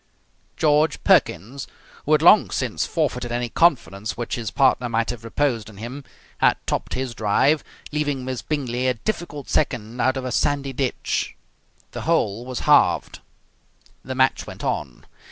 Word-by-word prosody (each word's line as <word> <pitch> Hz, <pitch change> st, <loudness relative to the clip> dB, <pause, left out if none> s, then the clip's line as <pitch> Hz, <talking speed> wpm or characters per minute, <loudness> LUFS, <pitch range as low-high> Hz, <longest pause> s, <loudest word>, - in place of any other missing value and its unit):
George 150 Hz, 0 st, +2 dB
Perkins, 120 Hz, +11 st, +2 dB, 0.4 s
who 155 Hz, -, +3 dB
had 155 Hz, 0 st, +4 dB
long 200 Hz, +4 st, +7 dB
since 125 Hz, -5 st, -2 dB
forfeited 125 Hz, -7 st, -1 dB
any 120 Hz, 0 st, -2 dB
confidence 115 Hz, -, +1 dB
which 120 Hz, -1 st, -4 dB
his 115 Hz, -3 st, -2 dB
partner 130 Hz, -2 st, +2 dB
might 115 Hz, 0 st, 0 dB
have 120 Hz, -2 st, -9 dB
reposed 115 Hz, -2 st, -1 dB
in 105 Hz, -, -14 dB
him, 125 Hz, +6 st, -7 dB, 0.4 s
had -, -, +4 dB
topped -, -, -2 dB
his 130 Hz, -2 st, -3 dB
drive, 130 Hz, +8 st, +2 dB, 0.3 s
leaving 145 Hz, -3 st, -1 dB
Miss 130 Hz, -1 st, -3 dB
Bingley 130 Hz, -4 st, -2 dB
a 125 Hz, -, +1 dB
difficult 150 Hz, -, -4 dB
second 120 Hz, +1 st, -1 dB
out 130 Hz, +1 st, +2 dB
of 130 Hz, -, -4 dB
a 130 Hz, -, -3 dB
sandy 140 Hz, +1 st, 0 dB
ditch. 130 Hz, -1 st, -2 dB, 0.6 s
The -, -, -6 dB
hole 120 Hz, -8 st, 0 dB
was 130 Hz, -2 st, -4 dB
halved. -, -, +3 dB, 0.8 s
The 130 Hz, 0 st, -5 dB
match 130 Hz, 0 st, +2 dB
went -, -, -9 dB
on. 65 Hz, -5 st, -3 dB
130 Hz, 155 wpm, -23 LUFS, 115-145 Hz, 0.8 s, long